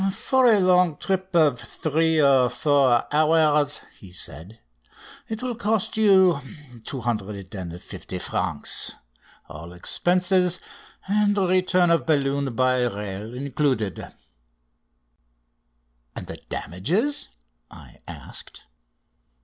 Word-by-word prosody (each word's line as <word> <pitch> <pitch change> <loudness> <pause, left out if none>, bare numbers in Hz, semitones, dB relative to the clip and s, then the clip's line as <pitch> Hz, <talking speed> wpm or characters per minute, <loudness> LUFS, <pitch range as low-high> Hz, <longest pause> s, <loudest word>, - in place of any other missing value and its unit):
"For 260 +6 +2
a 220 -3 +5
long 180 -4 +3
trip 190 -1 -3
of 150 -7 +3
three 160 +1 0
or 135 -4 +4
four 135 -5 +2
hours," 150 -1 +3 0.2
he 95 - -13
said, 90 +4 -7 0.7
"it 220 +2 -5
will 250 -1 -2
cost 220 -2 -1
you 190 -7 +4 0.5
250 100 -7 -5
francs, - - -1 0.5
all 85 +3 -10
expenses 180 - +1 0.5
and 205 +1 +2
return 185 -2 +2
of 165 - +1
balloon 140 -4 0
by 130 0 +2
rail 105 +1 -6
included." 130 -6 -2 2.0
"And - - -6
the - - -8
damages?" 180 - -1 0.4
I - - -15
asked. - - -9
150 Hz, 95 wpm, -23 LUFS, 120-185 Hz, 2.0 s, a